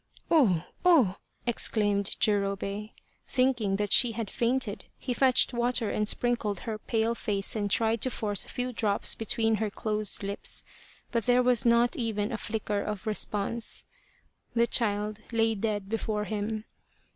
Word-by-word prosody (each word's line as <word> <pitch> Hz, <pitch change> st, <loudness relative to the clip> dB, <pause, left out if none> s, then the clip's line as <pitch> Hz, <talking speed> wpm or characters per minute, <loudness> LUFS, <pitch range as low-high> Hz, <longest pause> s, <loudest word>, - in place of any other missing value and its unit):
" -, -, -33 dB
Oh, 210 Hz, -, +4 dB, 0.2 s
oh! 280 Hz, -, +4 dB
" -, -, -41 dB
exclaimed 205 Hz, -4 st, +1 dB
Jurobei. 200 Hz, 0 st, -1 dB, 0.4 s
Thinking 245 Hz, -6 st, +1 dB
that 205 Hz, 0 st, 0 dB
she 240 Hz, -3 st, +5 dB
had 220 Hz, -2 st, -5 dB
fainted, 240 Hz, -3 st, -1 dB
he 250 Hz, -, -3 dB
fetched 255 Hz, 0 st, +4 dB
water 240 Hz, -2 st, +2 dB
and 210 Hz, -, 0 dB
sprinkled 225 Hz, -5 st, 0 dB
her 220 Hz, -2 st, -5 dB
pale 225 Hz, +1 st, 0 dB
face 205 Hz, -4 st, -1 dB
and 205 Hz, -2 st, -1 dB
tried 225 Hz, +2 st, +2 dB
to 255 Hz, -, +3 dB
force 205 Hz, -5 st, 0 dB
a -, -, -13 dB
few 250 Hz, 0 st, -3 dB
drops 210 Hz, -3 st, +1 dB
between 225 Hz, 0 st, 0 dB
her 220 Hz, 0 st, -1 dB
closed 210 Hz, 0 st, -1 dB
lips, 200 Hz, +1 st, -2 dB, 0.5 s
but 230 Hz, -1 st, -1 dB
there 250 Hz, 0 st, +4 dB
was 245 Hz, -2 st, +3 dB
not 235 Hz, +1 st, +3 dB
even 220 Hz, -3 st, -2 dB
a 220 Hz, -, -3 dB
flicker 210 Hz, -2 st, -2 dB
of 210 Hz, 0 st, -5 dB
response. 215 Hz, +1 st, 0 dB, 0.7 s
The 235 Hz, 0 st, +4 dB
child 210 Hz, -3 st, 0 dB
lay 225 Hz, -1 st, +2 dB
dead 205 Hz, -2 st, -2 dB
before 215 Hz, 0 st, -2 dB
him. 215 Hz, +1 st, -4 dB
220 Hz, 155 wpm, -28 LUFS, 205-235 Hz, 0.7 s, she